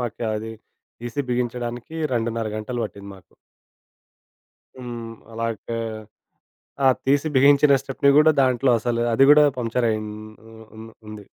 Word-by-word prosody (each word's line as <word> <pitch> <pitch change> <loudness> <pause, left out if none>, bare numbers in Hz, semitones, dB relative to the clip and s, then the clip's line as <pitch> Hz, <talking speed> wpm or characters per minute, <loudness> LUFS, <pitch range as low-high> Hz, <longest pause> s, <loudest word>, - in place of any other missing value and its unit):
మాకు 120 -1 -4
అది 110 +1 -5 0.5
తీసి 120 +4 -4
బిగించడానికి 120 +2 -4 0.2
2.30 115 -1 -2
గంటలు 120 +2 -4
పట్టింది 100 -1 -9
మాకు. 95 - -22 1.5
హ్మ్, 120 -2 -7 0.2
అలాగా 115 0 -4 1.1
ఆ! - - +5 0.2
తీసి 140 +3 +2
బిగించిన 140 +2 +5
స్టెప్ని 135 +1 +1
కూడా 155 +1 +6
దాంట్లో 130 0 +2
అసలు 120 +1 -1
అది 135 +4 +5
కూడా 150 0 +7 0.2
పంక్చరైయ్యిం 115 -2 -1 0.4
హ్మ్, 110 0 -14
హ్మ్, 110 +1 -11 0.2
ఉంది. 105 -1 -10
120 Hz, 120 wpm, -22 LUFS, 110-130 Hz, 1.5 s, కూడా